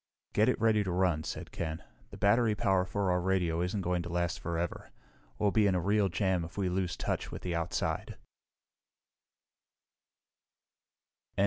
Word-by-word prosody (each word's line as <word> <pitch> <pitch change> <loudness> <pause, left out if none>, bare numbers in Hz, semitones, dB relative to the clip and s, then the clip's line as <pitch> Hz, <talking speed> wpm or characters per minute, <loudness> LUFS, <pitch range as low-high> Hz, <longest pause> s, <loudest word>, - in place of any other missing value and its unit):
"Get 110 +4 +4
it - - +1
ready 110 -2 +3
to 95 - -3
run," 90 -4 +1
said - - -6
Ken. 80 -2 -4 0.3
"The - - -10
battery 110 +1 +3
power 95 -2 +2
for 100 -1 0
our 90 0 +1
radio 90 -3 +1
isn't 90 +3 -1
going 90 -1 0
to 85 - -6
last 85 -1 -1
forever. 85 0 -3 0.5
We'll 105 -1 +2
be 105 -1 +4
in 95 - +2
a - - +2
real 100 +2 +2
jam 90 +1 +1
if 80 - -9
we 95 -2 +1
lose 90 -1 -1
touch - - -2
with - - -7
the 90 - -2
outside." 85 0 -2
90 Hz, 160 wpm, -31 LUFS, 85-100 Hz, 0.5 s, Get